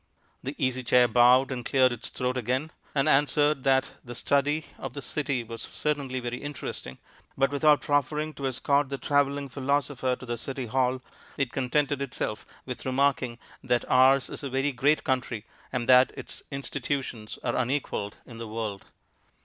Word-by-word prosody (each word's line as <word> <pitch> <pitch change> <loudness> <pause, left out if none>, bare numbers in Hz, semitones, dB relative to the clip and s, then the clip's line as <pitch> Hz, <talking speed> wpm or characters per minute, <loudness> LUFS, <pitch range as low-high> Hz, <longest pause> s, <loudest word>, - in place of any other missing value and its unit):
The 135 +3 -5
Easy 130 -1 0
Chair 125 0 +5
bowed 125 +3 +5
and 125 -2 -3
cleared 130 +1 +4
its 120 -1 -4
throat 125 0 -2
again, 130 +5 -1 0.2
and 140 +1 +2
answered 145 0 +3
that 135 -1 +3
the 120 -1 -8
study 145 +4 +1
of 135 -2 -6
the - - -3
city 140 -5 -1
was 115 0 -8
certainly 140 -4 -2
very 120 0 -4
interesting, 145 - -6 0.4
but 135 +1 +3
without 150 +1 +4
proffering 150 +2 0
to 140 -2 -3
escort 140 +2 +1
the 140 - -3
travelling 140 0 +1
philosopher 135 -1 0
to 125 - -11
the 120 -1 -3
City 130 +2 -4
Hall, 130 +1 0 0.3
it 135 -4 0
contented 140 +2 0
itself 110 -5 -3 0.2
with 125 -1 -6
remarking 130 -2 +1 0.3
that 120 -1 +1
ours 130 +1 +5
is - - -6
a 140 - -4
very 135 +2 0
great 140 +4 +2
country, 125 -4 -1 0.3
and 125 -1 -2
that 130 0 +7
its - - -6
institutions 135 -5 -3
are 120 - 0
unequalled 130 -5 -1
in 115 -2 -11
the 115 - -5
world. 105 -3 -4
130 Hz, 165 wpm, -27 LUFS, 125-140 Hz, 0.4 s, that